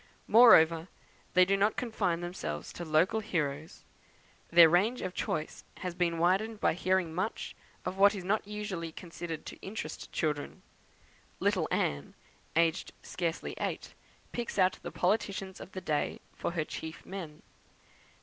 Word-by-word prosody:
Moreover, 165 -8 +7 0.5
they 185 0 +7
do 195 +2 +2
not 205 +2 +2
confine 180 -8 -1
themselves 90 - -5
to 175 - -6
local 165 +6 +2
heroes; 160 -8 -3 0.7
their 170 0 +9
range 195 +9 +2
of 180 - -3
choice 155 -3 -3
has 180 -2 -4
been 170 -1 0
widened 195 +6 +1
by - - +3
hearing 185 -1 0
much 185 +6 -3 0.3
of 190 - -3
what 200 +2 +6
is 190 - -5
not 200 +2 0
usually 205 -6 -4
considered 165 -1 -7
to - - -8
interest 205 +3 -6
children. 150 -3 -2 0.8
Little - - +1
Anne, 70 0 -1 0.4
aged 165 -1 +1
scarcely 170 -2 -3
eight, - - -3 0.4
picks 240 -2 -4
out 185 -1 +3
the - - -5
politicians 195 -1 -1
of 190 - -11
the 185 - -5
day 150 -4 -1 0.2
for - - -3
her 160 -3 -1
chief 160 +1 -7
men. 170 -6 -8
180 Hz, 145 wpm, -31 LUFS, 165-195 Hz, 0.8 s, their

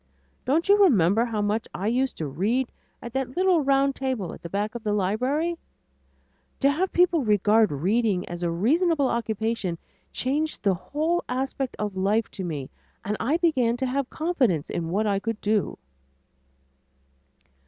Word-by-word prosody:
Don't 310 +8 +1
you 405 +1 +5
remember 220 - +4
how 220 -3 -2
much 210 +2 -1
I 190 - -4
used 255 +4 0
to 160 - -3
read 215 - -1 0.3
at 235 -1 -7
that 265 +1 -3
little 370 -3 +4
round 275 0 +3
table 260 -9 -3
at - - -11
the 170 - -7
back 205 +4 -2
of 240 -2 -7
the 210 -2 0
library? 255 - 0 1.0
To 280 0 +5
have 360 +6 -1
people 345 -4 +3
regard 210 -1 +3
reading 190 - 0
as 175 0 -6
a 175 - 0
reasonable 285 - +2
occupation 220 -5 -2 0.3
changed 300 +5 -2
the 200 -2 +3
whole 310 - -1
aspect 265 +1 -2
of 210 -2 -3
life 205 +4 +1
to 190 - -6
me 150 -6 -5 0.3
and 210 +2 -1
I 280 +8 +1
began 260 -9 +2
to 260 - -1
have 265 +1 -1
confidence 260 - 0
in 165 -1 -3
what 205 +5 0
I 200 -2 +1
could 225 +1 -3
do." 210 -1 0
230 Hz, 165 wpm, -25 LUFS, 200-275 Hz, 1.0 s, you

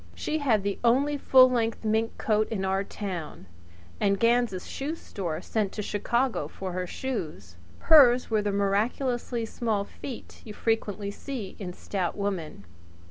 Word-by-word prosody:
She 310 - -2
had 230 -9 +2
the 200 -1 -2
only 270 +5 +3
full 260 -2 +6
length 230 -3 0
sealskin 220 +1 +1
coat 215 -1 +1
in 195 -4 -2
our 190 +1 +1
town, 185 - -6 0.5
and 200 -1 +2
Ganz' 230 -5 +2
shoe 290 +4 -4
store 175 - -5
sent 210 -3 -1
to 210 - -4
Chicago 235 +5 0
for 190 -1 -6
her 180 0 -3
shoes. 155 - -5 0.2
Hers 255 -6 +6
were 215 -1 +3
the 205 0 -1
miraculously 230 +4 0
small 220 -2 -1
feet 245 +3 -9
you 210 -2 -9
frequently 210 -3 -1
see 225 -4 -6
in 185 -3 -5
stout 185 -2 -3
women. 185 - -3
215 Hz, 150 wpm, -27 LUFS, 195-240 Hz, 0.5 s, full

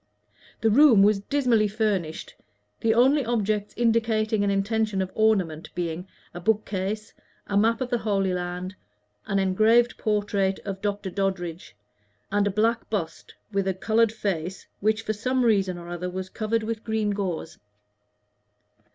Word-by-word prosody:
The 225 - +3
room 240 -5 +7
was 205 0 +4
dismally 235 -2 +2
furnished, 200 -6 -2 0.5
the 225 0 +2
only 270 +4 +4
objects 215 -3 -1
indicating 225 -2 +1
an 200 - +1
intention 205 +1 0
of 190 -1 -2
ornament 190 -8 +1
being 175 +1 -3 0.3
a 175 - -6
bookcase, 210 +1 -1 0.3
a 200 - -3
map 225 +3 +3
of 255 0 -3
the 240 - +1
Holy 195 -4 0
Land, 180 +1 -4 0.5
an 195 - 0
engraved 220 +6 +3
portrait 205 -3 0
of 195 -1 -5
Dr. 205 -2 -2
Doddridge, 175 - -3 0.6
and 205 0 +2
a - - +2
black 225 +4 0
bust 195 -7 -4 0.2
with 195 -1 0
a 190 - 0
colored 220 +3 +2
face, 190 -5 -3
which 215 +2 +1
for 215 - -1
some 255 +4 0
reason 195 -5 +2
or 170 0 -9
other 175 +1 -4
was 185 +1 -5
covered 220 +1 -1
with 225 0 -4
green 220 -2 0
gauze. 185 -5 -4
205 Hz, 150 wpm, -25 LUFS, 190-220 Hz, 0.6 s, room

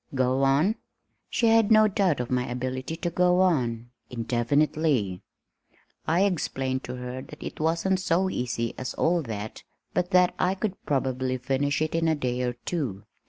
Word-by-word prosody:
Go 130 +1 +2
on." 145 +11 +3 0.5
She 235 - 0
had 225 -1 +4
no 215 -1 +6
doubt 190 -7 +1
of 125 0 -3
my 125 0 0
ability 130 +4 -3
to 170 +1 -3
go 180 +1 +3
on 120 -10 +1 0.2
indefinitely! 125 - 0 0.9
I 170 +3 +3
explained 135 -8 -1
to 125 - -5
her 125 +1 -6
that 150 - -11
it - - -7
wasn't 165 +4 +1
so 185 +1 +1
easy 120 -7 -2
as 130 - -4
all 170 +1 +2
that, 110 -5 -6 0.3
but 180 0 0
that 180 -1 +4
I 185 +1 +2
could 195 -1 -4
probably 130 -2 0
finish 140 +4 0
it 155 - -3
in 165 0 +1
a 160 - +3
day 125 -3 -2
or 125 -1 -1
two. 120 - -4
140 Hz, 165 wpm, -26 LUFS, 125-175 Hz, 0.9 s, no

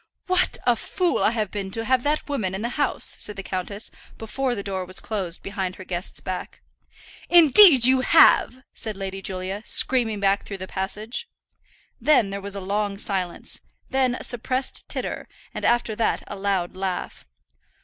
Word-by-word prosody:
"What 370 -1 +2
a 245 - +4
fool 355 - -1
I - - +4
have 215 -4 -2
been 200 -2 -4
to 225 +4 -4
have 255 0 +2
that 295 +3 -1
woman 215 -10 -2
in 200 - -4
the 235 - -1
house," 285 0 0
said 210 - -4
the 195 - -6
countess, 195 +3 -4 0.3
before 245 +3 -2
the 200 - -5
door 190 -2 -3
was 185 +1 -5
closed 190 -6 -4
behind 190 -2 -3
her - - -10
guest's 180 0 -5
back. 185 -1 -6 0.7
"Indeed 330 - +8
you 260 0 +5
have," 260 0 +5
said 215 -3 -4
Lady 195 0 -5
Julia, 190 +1 -4
screaming 230 -4 +2
back 200 0 +2
through 200 - -7
the 185 0 -7
passage. 210 - -4 0.7
Then 240 -6 +3
there 200 0 -4
was 200 0 -2
a 200 - -5
long 200 +1 -2
silence, 190 -4 -4 0.3
then 260 -2 +2
a - - -7
suppressed 255 +2 -2
titter, - - -4 0.3
and - - -6
after 235 -2 +1
that 225 - 0
a - - -7
loud 195 -3 -1
laugh. 185 -1 -4
205 Hz, 175 wpm, -24 LUFS, 190-250 Hz, 0.7 s, Indeed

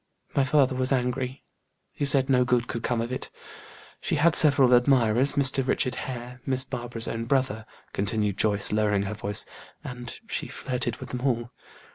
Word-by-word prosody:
My 140 - +3
father 135 -1 +3
was 130 +1 0
angry; 130 0 -1 0.5
he 145 - -3
said 135 -1 +3
no 125 -2 +3
good 120 -1 +1
could 115 - -4
come 120 -1 -1
of 120 +2 -4
it. 130 - -4 0.7
She - - -1
had 160 +2 +3
several 140 -5 +5
admirers, 125 0 +4
Mr. 135 -1 +1
Richard 125 - 0
Hare, 125 0 -7
Miss 130 0 +1
Barbara's 120 -3 -5
own 115 0 -3
brother," 120 -4 -1 0.3
continued 105 -1 -1
Joyce, 105 -2 +2
lowering 105 -2 +1
her 100 +2 -4
voice, 105 -1 0 0.4
"and 125 -1 -7
she - - -3
flirted 125 -2 -3
with - - -9
them 125 - -5
all. 120 -2 -1
125 Hz, 170 wpm, -26 LUFS, 115-130 Hz, 0.7 s, several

